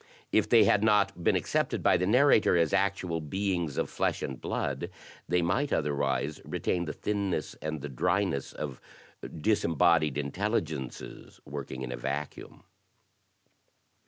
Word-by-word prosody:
If - - +2
they 115 -2 +7
had 105 +1 +3
not 105 -5 +2
been - - +3
accepted - - 0
by - - +5
the 90 - +1
narrator 125 -5 +5
as 85 -2 +2
actual 95 -4 0
beings 85 -2 -2
of - - 0
flesh - - -1
and 65 -3 -5
blood, - - -2 0.4
they 90 +1 +2
might 125 +12 0
otherwise 70 0 -1
retain 85 -1 -2
the 75 - -4
thinness 100 -7 -2
and 75 -1 -4
the 75 - -4
dryness 70 +2 0
of 70 -4 -6 0.6
disembodied 85 -5 +2
intel 90 +11 0
ligences 75 -5 -8
working 70 -2 -6
in 65 - -5
a 60 - -4
vacuum. 70 +4 -5
85 Hz, 140 wpm, -29 LUFS, 70-100 Hz, 0.6 s, they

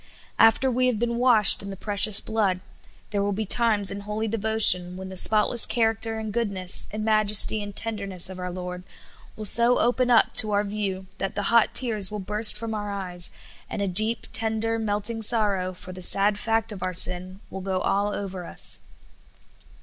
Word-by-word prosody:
After 225 +4 +3
we 255 +1 0
have 250 -3 -1
been 235 +1 -3
washed 240 -4 +5
in 200 - -9
the 195 - -7
precious 205 +1 +4
blood, 205 -5 -2 0.5
there 205 -1 -2
will 200 0 -2
be 215 +2 -4
times 210 -2 +2
in 200 +1 -7
hol}^ 210 +2 -5
devotion 210 -5 +2
when 190 0 -9
the 190 - -10
spotless 215 +4 +5
character 225 -1 -1
and 220 -2 -7
goodness 200 -6 -1
and 215 +1 -6
majesty 215 0 +3
and 205 -1 -9
tenderness 200 -5 -2
of 185 0 -9
our 180 0 -6
lyord 180 0 -8 0.5
will 215 - -7
so 235 +4 +3
open 245 +1 0
up 235 -2 +3
to 215 -1 +4
our 205 0 0
view 200 -2 -5
that 195 - -5
the 205 +2 -3
hot 235 -1 +2
tears 215 -7 +2
will 210 - -7
burst 210 +2 -1
from 225 0 -6
our 205 -1 -6
eyes, 180 -3 -3 0.4
and - - -6
a - - -3
deep, 215 +5 0
tender, 225 0 0
melting 220 +1 -2
sorrow 205 -5 0
for 185 0 -12
the 185 - -11
sad 200 +3 +4
fact 225 0 -2
of 200 -3 -10
our 185 0 -4
sin 185 +1 +1
will 190 - -8
go 190 0 -4
all 200 +2 -2
over 190 -3 -7
us. - - -2
210 Hz, 190 wpm, -23 LUFS, 190-225 Hz, 0.5 s, washed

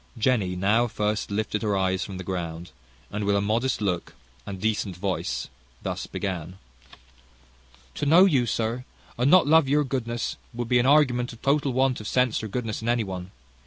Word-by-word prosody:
Jenny 110 -6 +1
now 105 +6 +2 0.4
lifted 105 +1 -2
her 105 -3 0
eyes 95 0 0
from 95 -2 -7
the 95 - -6
ground, 85 -2 -5 0.4
and 105 +1 -3
with 100 0 +2
a - - +3
modest 115 +5 0
look 90 -4 -2 0.3
and 95 -1 -5
decent 105 -3 -1
voice 90 -10 -2 0.4
thus - - -4
began: 90 -2 -4 1.4
"To 145 - -2
know 170 +6 +7
you, 135 -10 +2
sir, 115 +2 -1 0.3
and 125 +3 +2
not 185 +2 +7
love 155 -1 +5
your 150 +1 +3
goodness, 120 -4 -3 0.2
would 120 -1 -4
be 125 - +4
an 120 - +2
argument 130 -5 +3
of 115 - -16
total 140 0 +2
want 130 -1 +1
of 105 - -7
sense 125 -1 +1
or 110 - -4
goodness 115 0 -3
in 115 - -2
any 120 -1 +2
one. 95 -2 -6
110 Hz, 180 wpm, -25 LUFS, 95-125 Hz, 1.4 s, know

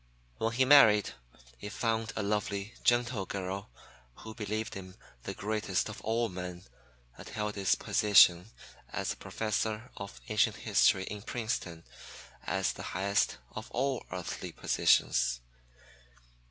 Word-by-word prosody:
When 115 +1 0
he 130 +2 +3
married, 120 -7 +7 0.5
he 105 - -6
found 115 0 -1
a - - -2
lovely, 105 +1 -2
gentle 120 -4 +2
girl, 95 0 -4 0.5
who 110 - -10
believed 110 +1 -3
him 95 -1 -9 0.3
the - - -4
greatest 105 -2 -1
of 110 - -8
all 115 +2 0
men 90 -1 -7 0.6
and - - -9
held 105 -1 -3
his 100 -2 +2
position 95 -2 +5 0.4
as - - -2
Professor 110 +2 -3
of 100 -11 -8
Ancient - - +2
History 95 - +3
in 105 +1 -6
Princeton 110 -8 -4 0.6
as - - 0
the - - -9 0.2
highest 100 -8 +1
of 110 - -8
all 130 +1 -1
earthly 90 -2 -5
positions. - - +2
105 Hz, 125 wpm, -31 LUFS, 95-110 Hz, 0.6 s, married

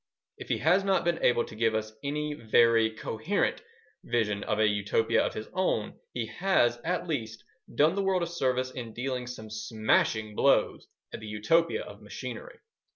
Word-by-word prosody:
If - - -9
he - - +1
has 190 +2 +3
not 195 -1 +2
been 170 -1 0
able 120 -1 +3
to - - -11
give 110 0 +1
us 110 0 -3
any 150 +1 -2
very, 115 -2 +4
coherent 110 - -2 0.4
vision 105 -4 0
of 105 - 0
a 110 - +4
Utopia 105 +2 +1
of - - -3
his 110 - -5
own, 180 - 0 0.2
he 120 -2 -3
has, 120 - +2
at 180 +1 -1
least, 115 -8 -4 0.3
done 155 +3 +4
the 200 - -1
world 190 -2 +1
a - - +1
service 130 -6 -1
in 115 -4 -7
dealing 125 0 -3
some 110 -3 -8
smashing 110 -1 0
blows - - +2 0.3
at - - -5
the 110 - -9
Utopia 110 +11 +1
of - - -12
machinery. - - -8
120 Hz, 175 wpm, -28 LUFS, 110-165 Hz, 0.4 s, very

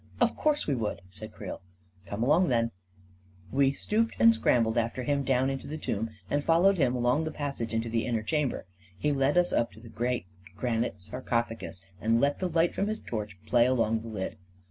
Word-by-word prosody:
" - - -27
" - - -20
Of - - +3
course 300 -1 +1
we 145 - +1
would! 110 -7 -2
" - - -24
said 110 +3 -9
Creel. 100 -3 -7 0.5
11 - - -14
Come 100 +3 -2
along, 160 +8 +4
then! 115 -3 +1 0.4
" 90 0 -30 0.3
We 135 0 +4
stooped 220 +10 0
and 230 0 +7
scrambled 115 - +2
after 120 +2 0
him 140 +1 +1
down 130 0 +2
into 135 - -5
the 155 - -4
tomb, 115 -6 -2 0.2
and 145 0 0
followed 175 +4 +4
him 130 -3 +3
along 125 +5 +2
the 160 - -2
passage 140 -7 -4
into 115 0 -1
the 115 +1 -1
inner 115 -3 0
chamber. 150 - -1 0.3
He 145 +10 +1
led 140 +3 +2
us 175 0 +3
up 115 - +1
to - - -14
the 115 0 -12
great 120 -2 -1 0.3
gran 115 -2 +1
ite 110 - -5
sarcophagus 115 -1 -3 0.2
and 115 +1 +3
let 140 +3 +2
the 185 - -1
light 165 +1 +2
from 200 - 0
his 215 +1 -2
torch 105 -4 -5
play 120 +2 +4
along 115 -3 +2
the 115 - -9
lid. 105 -4 -4
125 Hz, 225 wpm, -29 LUFS, 115-145 Hz, 0.5 s, and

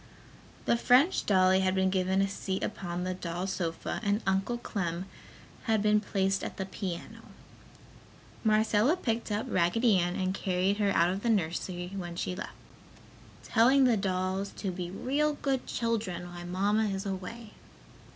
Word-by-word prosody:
The 235 - +3
French 255 +9 +4
dolly 185 -1 +5
had 190 0 +1
been 190 0 +2
given 190 +1 +2
a - - +1
seat 195 -1 -3
upon 175 -1 -3
the 185 0 -1
doll 180 0 -4
sofa 170 -4 -3
and 205 0 0
Uncle 195 +5 +1
Clem 180 -6 -3 0.6
had 220 -3 +2
been 210 0 +4
placed 195 -2 0
at - - -5
the 190 - -2
piano. 190 -2 -6 1.2
Marcella 220 - +3
picked 230 -6 -2
up 210 +1 -1
Raggedy 195 +4 +3
Ann 175 0 0
and 185 0 -1
carried 190 +1 0
her 205 -1 +2
out 175 -2 +3
of 195 +2 -3
the 235 - 0
nursery 180 -2 -1
when 175 -3 -5
she 180 +1 -3
left, - - -6 0.9
telling 255 +4 +4
the 245 -3 +5
dolls 190 0 -1
to 195 - -2
"be 175 -1 -5
real 280 +10 0
good 275 -3 -2
children, 215 -7 -2
while 175 0 -7
Mamma 205 +4 +1
is 195 -1 -2
away!" 205 +4 -6
195 Hz, 160 wpm, -30 LUFS, 185-220 Hz, 1.2 s, dolly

